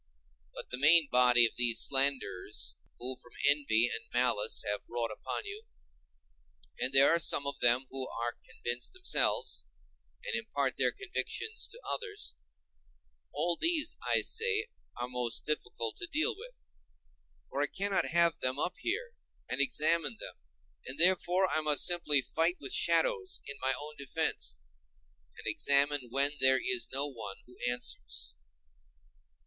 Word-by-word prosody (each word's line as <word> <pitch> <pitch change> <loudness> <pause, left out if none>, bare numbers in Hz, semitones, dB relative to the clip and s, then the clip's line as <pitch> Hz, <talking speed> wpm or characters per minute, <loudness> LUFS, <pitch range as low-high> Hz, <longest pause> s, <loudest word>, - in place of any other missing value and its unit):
But - - -9
the 125 - -4
main 155 +2 +7
body 125 -1 +6
of 115 - +1
these 120 -2 +3
slanderers 135 -8 -1 0.2
who 130 +2 -3
from 120 - -13
envy 140 -6 +4
and 115 - -3
malice 120 -4 +2
have 105 0 -1
wrought 120 -1 -2
upon 110 - -5
you—and 420 - -9
there 135 +2 +6
are 170 - +2
some 145 -3 +2
of 140 - -4
them 120 +2 +4
who 130 -1 -5
are 120 +1 -3
convinced 120 -1 -4
themselves, 370 0 -1 0.6
and - - -3
impart - - -2
their - - +3
convictions 435 +3 -4
to 470 - -10
others—all - - -7
these, 330 -2 +2
I - - +2
say, 450 0 +2 0.3
are 120 0 -3
most 125 -2 -2
difficult 120 -6 -3
to 345 - -4
deal 330 +8 0
with; - - -12 1.0
for 140 - -1
I 145 - +2
cannot 200 0 -1
have 170 -1 +2
them 130 +1 0
up 175 - -2
here, 465 +6 -3 0.3
and - - 0
examine 155 - +1
them, - - -7 0.5
and 130 - -7
therefore 185 +1 +3
I 155 - 0
must 150 -2 +2
simply 150 -6 +2
fight 165 +6 0
with 385 - -6
shadows 460 -7 +1
in 140 - -7
my 130 0 +1
own 150 +1 -8
defence, 140 - -3 0.8
and - - -12
examine 140 -2 +2
when 140 +3 +3
there 130 0 +6
is 380 -2 0
no 135 +2 0
one 110 -8 -7
who 125 - -17
answers. 120 - -3
140 Hz, 145 wpm, -31 LUFS, 120-185 Hz, 1.0 s, main